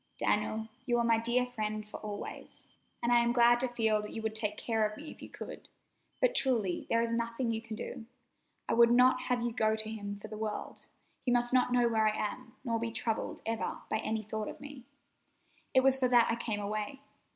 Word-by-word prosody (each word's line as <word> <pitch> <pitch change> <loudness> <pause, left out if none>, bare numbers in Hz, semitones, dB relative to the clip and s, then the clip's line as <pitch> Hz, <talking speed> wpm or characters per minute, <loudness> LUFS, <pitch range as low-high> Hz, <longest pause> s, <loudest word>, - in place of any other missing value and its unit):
"Daniel, 215 +1 0 0.2
you 240 -1 +3
are 235 - +2
my 230 -1 +3
dear 240 +2 +2
friend 215 -3 -3
for - - -6
always, 210 -1 -7 0.3
and 235 - +2
I 240 - +6
am 235 0 +2
glad 240 0 +5
to 260 - +1
feel 225 -3 +1
that 210 - -7
you 225 - -5
would 220 0 -1
take 210 -1 -1
care 225 -2 0
of 215 0 -1
me 305 +1 -8
if - - -14
you - - -9
could, - - -9 0.5
but - - +3
truly 235 - +1
there 230 0 +3
is 230 - -1
nothing 230 +1 -1
you 225 0 -2
can 225 -1 -7
do. 225 +1 -7 0.6
I - - +1
would 235 0 +6
not 255 +1 +5
have 245 -1 0
you 240 - 0
go 220 -2 +2
to 220 0 -4
him 205 -2 -5
for 215 - -8
the 215 0 -8
world. 215 -1 -5 0.3
He - - -2
must 245 0 +2
not 250 -1 +4
know 245 -1 +4
where 220 -2 +2
I 215 - +1
am, 235 +3 -4
nor 230 -2 0
be 230 0 -2
troubled 225 -1 -3
ever 225 0 -2
by - - +2
any 220 0 -2
thought 215 0 -4
of - - -7
me. 285 -3 -10 0.9
It 260 - +5
was 265 0 +4
for 255 - +3
that 240 -2 +5
I - - +1
came 225 -3 -2
away. 215 +6 -3
230 Hz, 230 wpm, -32 LUFS, 215-245 Hz, 0.9 s, I